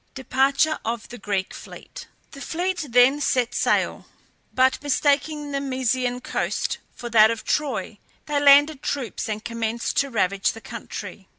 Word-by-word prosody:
DEPARTURE 270 +3 +1
OF 230 0 -4
THE 245 - -9
GREEK 200 -2 -2
FLEET. - - -11 0.2
The 275 - -11
fleet 350 0 -2
then 250 +4 +4
set 250 -3 +1
sail; - - 0 0.4
but 260 0 +2
mistaking 290 +1 0
the 275 0 -2
Mysian 255 -2 -1
coast - - -2 0.2
for 240 - -7
that 220 -1 +7
of 230 -1 -3
Troy, 300 -2 -2 0.3
they 295 -1 0
landed 285 +1 +6
troops 255 -6 -3
and 215 0 -4
commenced 230 0 -3
to 280 - +2
ravage 200 -4 0
the 225 - -11
country. - - -8
260 Hz, 150 wpm, -23 LUFS, 230-285 Hz, 0.4 s, that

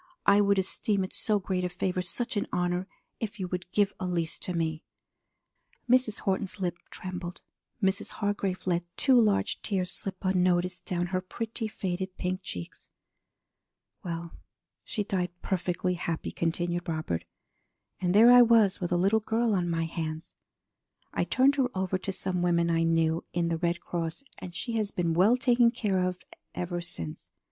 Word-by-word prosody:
I 200 +1 +6
would 200 -1 +3
esteem 195 +1 0
it 185 - -5
so 215 -1 +3
great 185 -2 -2
a 180 - 0
favor, 180 +1 -1
such 235 +7 -1
an 205 - 0
honor, 180 +1 0 0.3
if 215 -2 -4
you 185 - -2
would 180 0 -4
give 205 0 +2
Elise 175 -3 -2
to - - -4
me.'" 160 -1 -1 1.0
Mrs. 250 -3 +3
Horton's 195 0 -1
lip 175 -2 -2
trembled. 180 -1 -6 0.4
Mrs. 190 +2 +1
Hargrave 200 -3 -2
let 175 -1 0
two 260 -3 +5
large 210 -3 +1
tears 185 -3 -1
slip 190 -1 -6
unnoticed 180 -1 +1
down 175 -1 0
her 185 - +1
pretty, 225 +4 -4
faded 190 -2 -4
pink 185 +1 -2
cheeks. 90 - -8 1.1
"Well, 170 -1 -4 0.5
she 210 - -2
died 180 -3 -2
perfectly 180 -1 0
happy," 170 -2 -3
continued 175 +1 -1
Robert. 155 - -2 0.8
"And 180 0 +1
there 230 +3 +9
I 245 0 +10
was 225 -5 +5
with 175 - -2
a 175 - +3
little 195 +5 +3
girl 225 +1 +1
on 180 -3 +1
my 165 -1 0
hands! 160 -1 -5 0.8
I - - +1
turned 275 +2 +3
her 260 -2 +2
over 185 0 0
to 195 - -3
some 185 -1 -2
women 170 -1 +2
I 165 0 +2
knew 165 0 +2
in 170 -1 +1
the 165 - 0
Red 175 0 0
Cross, 170 +7 -4 0.2
and 175 -1 -8
she 235 - -4
has 215 -2 0
been 170 -4 0
well 200 +9 +5
taken 245 -2 +4
care 200 -6 0
of 180 0 -1 0.4
ever 175 0 -2
since. 85 - -7
185 Hz, 170 wpm, -29 LUFS, 175-205 Hz, 1.1 s, I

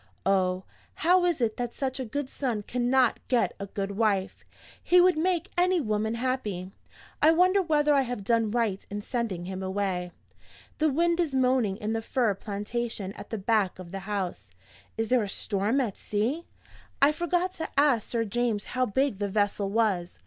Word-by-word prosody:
Oh, 185 -1 +2 0.3
how 355 +2 +3
is 345 -6 +1
it 220 -2 0
that 245 -1 -3
such 265 -1 -2
a 260 - -2
good 285 +4 -3
son 245 -6 -3
cannot 250 +2 +2
get 245 -2 +2
a 200 - -5
good 195 0 -3
wife! 200 -2 0 0.4
He 360 - +5
would 360 -1 +5
make 350 +3 0
any 360 0 +3
woman 220 -3 -1
happy. 225 -7 -2 0.5
I 305 - +7
wonder 365 +4 +4
whether 300 -4 +2
I 280 - +4
have 245 -5 -4
done 230 +1 +2
right 220 -4 0
in 205 0 -5
sending 220 -9 -3
him 190 +1 -5
away? 190 -2 -2 0.7
The 310 0 +3
wind 340 +4 +1
is 315 -6 0
moaning 250 -6 +2
in 210 +1 -3
the 225 - -1
fir 230 -2 +1
plantation 205 0 -4
at - - -10
the 225 - -3
back 205 -2 +1
of 180 -2 -10
the 195 - -4
house. 190 - -4 0.5
Is 225 0 -1
there 250 -1 +4
a 205 - -3
storm 205 +6 0
at 230 -7 -2
sea? 240 +11 -2 0.5
I 280 +2 +6
forgot 350 +3 0
to 320 - -5
ask 280 -6 +3
Sir 230 -1 0
James 225 -1 -1
how 255 0 +1
big 260 0 0
the 205 -1 -1
vessel 205 0 0
was. 200 -5 0
230 Hz, 185 wpm, -27 LUFS, 200-275 Hz, 0.7 s, I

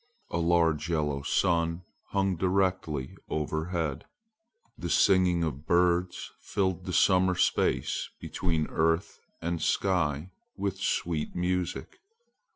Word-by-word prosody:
A 85 - -1
large 85 -1 +2
yellow 75 -4 0
sun 85 +3 +1 0.2
hung 95 -1 0
directly 90 -6 0
overhead. 80 0 -2 0.7
The - - -5
singing 90 -3 +4
of 75 -2 -4
birds 90 0 +1
filled 95 -3 -1
the - - -3
summer 90 0 +4
space - - +1
between 80 -4 -1
earth 80 +2 0 0.2
and 85 -1 -2
sky 85 -4 0 0.3
with 100 -1 -2
sweet 85 -5 -1
music. 90 0 -2
85 Hz, 105 wpm, -28 LUFS, 80-90 Hz, 0.7 s, singing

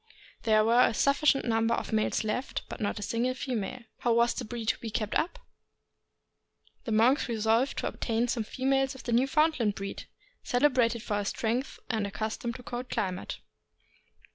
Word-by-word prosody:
There 215 -1 +4
were 235 +2 +5
a 225 - -2
sufficient 280 +1 +3
num 225 -1 +2
ber 235 - +2
of - - -4
males 215 0 +1
left, 220 +5 -2
but - - -8
not 205 - -1
a 205 - -4
single 240 +5 0
female. 250 -2 -3 0.2
How 240 - +2
was 235 +1 +3
the - - -4
breed 230 -1 -4
to - - 0
be 230 - -5
kept 215 -1 -2
up? 365 +9 0 1.5
The 230 - -3
monks 240 +6 +3
resolved 225 +3 +1
to - - -1
obtain 230 +1 -1
some 235 -2 -1
females 270 +3 0
of 265 - -11
the 240 - -3
Newfoundland 260 -3 +2
breed, 195 0 -6 0.4
cele 275 +4 +3
brated 235 -3 +1
for 210 -3 -1
their 205 - -2
strength, 240 +4 -2
and 220 -3 -1
accustomed 220 +3 -3
to - - -8
a - - -21
cold 245 +1 -5
climate. 190 -5 -3
235 Hz, 185 wpm, -29 LUFS, 220-255 Hz, 1.5 s, were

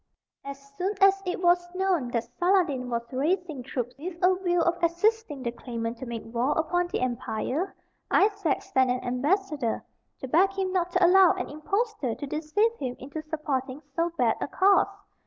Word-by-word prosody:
As 275 0 -7 0.2
soon 385 +3 0
as 390 0 +5
it 360 0 -2
was 350 0 +3
known 370 -8 +1
that 235 -1 -1 0.2
Saladin 350 -9 +2
was 235 -1 -2
raising 315 +1 -1
troops 245 -1 -4
with 345 +3 -6
a 365 +1 +6
view 350 -1 +2
of 340 +1 +1
assisting 340 - +1
the 235 - -1
claimant 235 -1 -5
to 260 - -6
make 235 -1 -5
war 240 +5 0
upon 350 +3 +1
the 350 - -3
empire, 255 - -2 0.3
Isaac 400 -7 +2
sent 260 -1 +2
an 250 0 -1
ambassador 285 - -1 0.4
to 265 - -4
beg 370 +8 +3
him 375 -1 -1
not 360 -2 +1
to 365 0 +4
allow 370 0 +7
an - - -4
impostor 350 - -2
to 290 - -6
deceive 315 +11 0
him 255 -3 -3
into 285 +4 -7
supporting 295 -3 -3
so 335 +1 +1
bad 235 -3 +2
a - - -1
cause. 385 +5 +4
315 Hz, 175 wpm, -27 LUFS, 255-370 Hz, 0.4 s, allow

